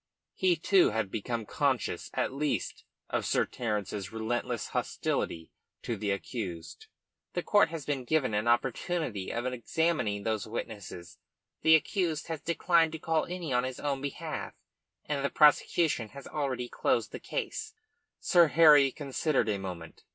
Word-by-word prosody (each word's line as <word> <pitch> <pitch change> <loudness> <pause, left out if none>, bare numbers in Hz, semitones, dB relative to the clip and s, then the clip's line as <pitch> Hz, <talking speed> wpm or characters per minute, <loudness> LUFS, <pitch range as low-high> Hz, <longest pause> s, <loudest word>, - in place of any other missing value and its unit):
He 185 -2 +2
too 185 +3 +4
had 105 -3 -2
become 115 +1 -3
conscious - - -1
at - - 0
last 150 +2 -2 0.3
of - - 0
Sir - - +2
Terence's 105 -4 -3
relentless 110 +2 -2
hostility 80 -1 -2 0.3
to 115 - -2
the 105 0 -3
accused. 100 -4 -5 0.5
"The 175 - -2
court 205 -5 +4
has 160 -4 -6
been 135 -4 -2
given 145 -5 +1
an 105 +2 0
opportunity 120 - 0
of 120 +1 -3
examining 125 -4 0
those 110 -1 -1
witnesses, 105 -6 -7 0.4
the 160 0 +7
accused 165 -1 0
has 160 -2 -4
declined 170 -1 +2
to - - -3
call 160 0 0
any 175 -6 -4
on 125 0 +2
his 130 -1 -4
own 140 -2 -2
behalf, 140 -1 -5 0.5
and 145 -2 -2
the 140 - +1
prosecution 150 -4 +3
has 140 +4 -11
already 130 -4 -2
closed 115 -1 0
its - - -8
case." - - -3 0.4
Sir 175 -2 +5
Harry 150 -3 +7
considered 140 -3 0
a 100 -2 0
moment. 90 -4 -7
130 Hz, 150 wpm, -30 LUFS, 110-160 Hz, 0.5 s, the